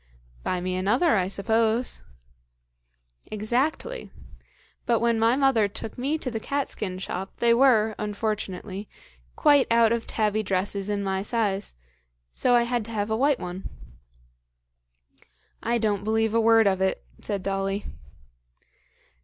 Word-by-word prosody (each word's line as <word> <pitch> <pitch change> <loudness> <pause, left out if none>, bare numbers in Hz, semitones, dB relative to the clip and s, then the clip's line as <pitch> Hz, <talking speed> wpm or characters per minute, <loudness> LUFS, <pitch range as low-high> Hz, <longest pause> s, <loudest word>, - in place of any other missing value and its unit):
"Buy 180 - -2
me 185 +1 -2
another, 220 - +2
I 185 -3 +1
suppose." 225 +4 0 1.3
"Exactly. 260 - -2 0.8
But 235 -2 +3
when 235 -1 +2
my 230 +2 +4
mother 265 -6 +3
took 205 +2 -7
me 275 +5 -1
to 260 -5 -4
the 225 - -3
cat 280 +4 -2
skin 185 -3 -3
shop, 190 0 -5
they 235 0 +4
were, 235 -4 +4
unfortunately, 210 -2 -4 0.5
quite 290 -2 +4
out 230 -1 +4
of 235 -1 -1
tabby 215 -1 0
dresses 195 0 -2
in 205 -1 -1
my 190 -1 -1
size, 205 - -1 0.6
so 245 -1 +2
I 240 - +5
had 240 -1 -1
to 230 - -8
have 210 -1 -2
a - - +2
white 275 +3 +2
one." 180 +2 -6 1.9
"I 235 +1 +1
don't 210 -3 0
believe 220 0 +1
a 230 - +3
word 225 0 +5
of 190 -1 +2
it," 190 0 0 0.2
said 200 -3 -3
Dolly. 195 +1 -2
220 Hz, 140 wpm, -25 LUFS, 200-235 Hz, 1.9 s, I